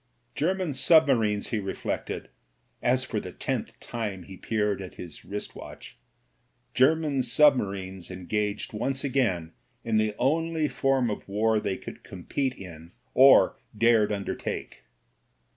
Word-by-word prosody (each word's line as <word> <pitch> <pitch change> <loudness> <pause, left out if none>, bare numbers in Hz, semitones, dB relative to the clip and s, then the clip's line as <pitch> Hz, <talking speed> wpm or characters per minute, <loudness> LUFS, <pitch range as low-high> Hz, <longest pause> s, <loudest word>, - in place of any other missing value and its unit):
German 180 0 0
submarines, 130 -8 +3
he 110 - -1
reflected, 95 -1 -4 0.5
as 130 +1 +2
for 110 -4 -3
the 90 - -7
tenth - - -4
time 105 -6 -5
he 95 +2 -11
peered 105 +1 -1
at 95 - -9
his 85 -3 -10
wrist 105 +1 -6
watch, - - -11 0.8
German 145 +1 +3
submarines 100 - +2
engaged 100 +4 -3
once 135 +5 -1
again 115 - 0 0.3
in 115 -1 +1
the 110 -1 +1
only 160 +4 +1
form 135 -5 +1
of 105 - -6
war 110 +2 +2
they 100 -2 -2
could - - -10
compete 130 +9 -3
in 85 -3 -11 0.2
or 135 +1 +6 0.2
dared 115 -2 +4
undertake. 100 -1 -4
110 Hz, 125 wpm, -27 LUFS, 100-135 Hz, 0.8 s, or